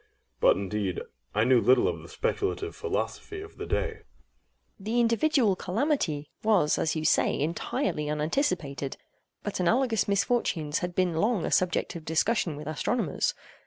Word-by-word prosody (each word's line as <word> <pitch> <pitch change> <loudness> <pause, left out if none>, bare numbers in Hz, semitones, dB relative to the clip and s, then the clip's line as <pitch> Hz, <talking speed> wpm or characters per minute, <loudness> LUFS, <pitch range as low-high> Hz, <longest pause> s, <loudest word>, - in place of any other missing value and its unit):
But, - - +5
indeed, 100 -2 -2 0.4
I 105 - +4
knew 125 0 +5
little 130 +3 +4
of - - -2
the - - -12
speculative 405 +1 -2
philosophy 420 -2 -3
of 410 +1 -11
the - - -6
day. - - 0
EIROS. - - -14 0.8
The 220 +5 -1
individual 235 -2 +3
calamity 185 - -1
was 205 -9 +3
as 160 - 0
you 155 0 -2
say - - +3
entirely 155 - -1
unanticipated; 150 - -1 0.5
but 205 - -3
analogous 225 +5 +2
misfortunes 200 -7 +1
had 180 -2 -4
been 180 -3 +1
long 210 +1 +1
a - - -2
subject 180 -1 +1
of 165 - -6
discussion 165 +1 +1
with 150 +1 -8
astronomers. 160 - -1
180 Hz, 150 wpm, -28 LUFS, 150-235 Hz, 0.8 s, But